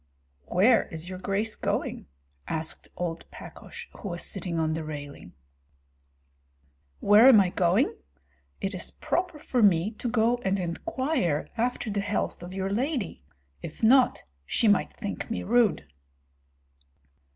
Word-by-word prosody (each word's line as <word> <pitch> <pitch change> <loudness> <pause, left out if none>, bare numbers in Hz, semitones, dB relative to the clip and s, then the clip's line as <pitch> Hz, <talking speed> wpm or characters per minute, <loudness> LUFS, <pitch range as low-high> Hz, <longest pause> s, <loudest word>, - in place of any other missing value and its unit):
"Where 220 +6 +4
is 165 +1 -6
your 185 -1 -6
grace 200 +3 -1
going?" - - -2 0.4
asked 160 0 -3
old 170 -2 -4
Pakosh, - - -10
who 205 - -5
was 175 -1 -3
sitting 175 -3 -3
on 160 -1 +1
the 160 0 -3
railing. 145 - -8 1.7
"Where 210 +5 +7
am 250 -6 +9
I 185 -3 +2
going? 185 +10 +2 0.6
It 195 - -3
is 185 - -3
proper 355 -3 -2
for 255 -4 -1
me 195 -1 +4
to 235 +2 -4
go 230 +1 +2
and 195 -4 -1
inquire 185 - -1
after 240 -1 -1
the 200 0 -1
health 205 -3 -2
of 175 +1 -8
your 190 0 -3
lady; 245 - -2 0.4
if 160 - -9
not, 255 +3 +5 0.2
she 220 - +1
might 205 -2 +3
think 205 +1 -6
me 225 - -3
rude." 230 - +2
200 Hz, 140 wpm, -27 LUFS, 175-235 Hz, 1.7 s, am